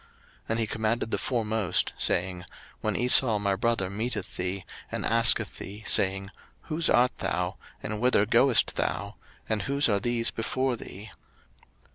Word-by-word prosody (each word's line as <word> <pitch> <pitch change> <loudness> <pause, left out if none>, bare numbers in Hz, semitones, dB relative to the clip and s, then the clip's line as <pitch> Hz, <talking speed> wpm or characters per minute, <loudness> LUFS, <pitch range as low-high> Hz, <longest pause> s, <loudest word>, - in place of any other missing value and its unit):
01:032:017 - - -28 0.4
And 115 +1 0
he 115 - +1
commanded 110 +1 -2
the - - +1
foremost, 110 -7 0
saying, 90 0 -1 0.4
When 110 -2 -2
Esau 125 -2 +5
my 100 -1 0
brother 115 -2 0
meeteth 105 +1 -4
thee, 90 0 -3 0.3
and - - -3
asketh 115 0 +3
thee, 105 +2 -9
saying, 95 0 +2 0.3
Whose 165 +1 -1
art 125 +1 +3
thou? 90 +1 -2 0.3
and 105 0 -4
whither 125 -5 +3
goest 120 +3 +3
thou? - - -2 0.3
and 110 -2 -1
whose 140 +6 +1
are 100 -3 +1
these 115 +2 -1
before 130 +3 -1
thee? 105 -2 -10
110 Hz, 150 wpm, -27 LUFS, 100-120 Hz, 0.4 s, Esau